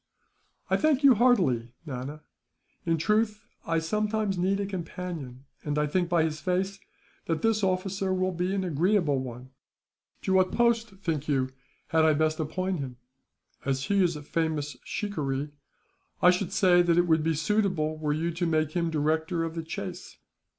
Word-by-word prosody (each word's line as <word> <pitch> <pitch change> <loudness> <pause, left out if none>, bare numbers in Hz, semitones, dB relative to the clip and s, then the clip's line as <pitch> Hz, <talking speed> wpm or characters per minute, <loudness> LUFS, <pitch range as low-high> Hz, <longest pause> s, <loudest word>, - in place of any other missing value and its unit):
"I - - +2
thank 305 -3 +2
you 275 -2 +8
heartily, 180 - +2
Nana. 140 +2 -6 0.7
In 165 0 +2
truth, 210 +5 +1 0.2
I 165 - +1
sometimes 210 +4 0
need 190 +2 +1
a 200 - -1
companion; 170 -8 -6 0.2
and 145 0 -2
I 150 - +2
think, 175 +3 0
by 170 -2 +3
his 155 -1 -2
face, 190 +3 -1 0.5
that 165 -1 -1
this 225 -1 +2
officer 190 +1 0
will 185 0 +1
be 180 +1 -1
an 195 - 0
agreeable 170 -3 +2
one. 125 0 -7 0.7
To 190 - +1
what 185 0 +4
post, 235 -1 +2
think 155 -4 -1
you, 135 -3 +1 0.4
had 160 0 +3
I 160 -1 +5
best 155 +1 +1
appoint 185 +3 -2
him?" 130 -3 -5 0.7
"As 135 -1 -1
he 200 +5 +2
is 175 -2 +1
a 150 - -7
famous 150 -3 -2
shikaree, 145 -8 -3 0.7
I 180 - +7
should 180 0 -2
say 180 -2 +5
that 175 -1 +2
it 175 - +4
would 160 -2 +3
be 160 0 +1
suitable 165 -3 +1
were 155 -1 -2
you 160 +3 0
to 175 +1 -1
make 155 -2 +1
him 170 0 0
director 160 +2 0
of 165 -1 -3
the 165 - -3
chase." 180 +2 -7
170 Hz, 170 wpm, -28 LUFS, 155-190 Hz, 0.7 s, you